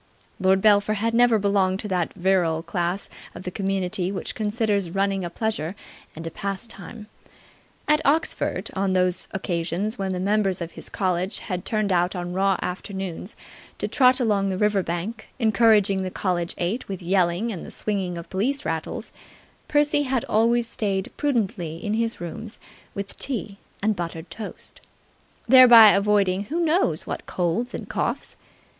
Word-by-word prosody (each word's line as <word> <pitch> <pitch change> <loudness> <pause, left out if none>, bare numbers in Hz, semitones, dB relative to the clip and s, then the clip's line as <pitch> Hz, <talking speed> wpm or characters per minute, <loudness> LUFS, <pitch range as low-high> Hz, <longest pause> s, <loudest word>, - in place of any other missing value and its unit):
Lord 190 0 +3
Belpher 210 0 +4
had 225 +2 -1
never 240 -1 +5
belonged 195 -2 +1
to 210 - -5
that 180 -3 -1
virile 175 -4 +1
class 175 +1 -2 0.3
of - - -8
the 180 - -4
community 190 -1 -1
which 195 - -4
considers 210 -3 0
running 195 +1 0
a 175 - -3
pleasure 190 -3 -3 0.4
and 165 +1 -7
a 165 - -4
pastime. 200 +2 -6 0.8
At 300 +1 +3
Oxford, 310 +4 0
on 195 0 0
those 180 -1 +1
occasions 185 +3 -2
when 190 -1 -1
the 180 - -2
members 195 -1 +1
of 170 -1 -5
his - - -9
college 185 -1 -1
had 180 -3 -4
turned 215 -2 0
out 180 +1 +2
on 175 0 -4
raw 195 0 +2
afternoons 190 0 -5 0.4
to - - -2
trot 255 -2 +4
along 205 -5 +1
the 190 - -2
river 210 -1 +2
bank 185 +7 -4
encouraging 215 -4 +4
the 185 - -2
college 180 -2 -2
eight 190 +9 -2
with 190 -2 -6
yelling 180 +4 +1
and 185 - -6
the - - -9
swinging 190 -4 -2
of 170 - -8
police 265 +9 -1
rattles, - - -4 0.6
Percy 295 0 +3
had 265 -4 -1
always 230 +2 +2
stayed 195 -4 -2
prudently 205 - -1
in 205 +5 -3
his 230 +1 -1
rooms 215 +6 -7 0.4
with 200 0 -6
tea 210 -6 -3 0.2
and 215 0 +2
buttered 170 -1 -6
toast, 215 -2 -8 0.7
thereby 240 -3 +10
avoiding 200 -1 +2
who 320 +10 -3
knows 340 +2 +1
what - - -6
colds 180 +8 -1
and - - -6
coughs. - - -2
195 Hz, 160 wpm, -24 LUFS, 180-220 Hz, 0.8 s, thereby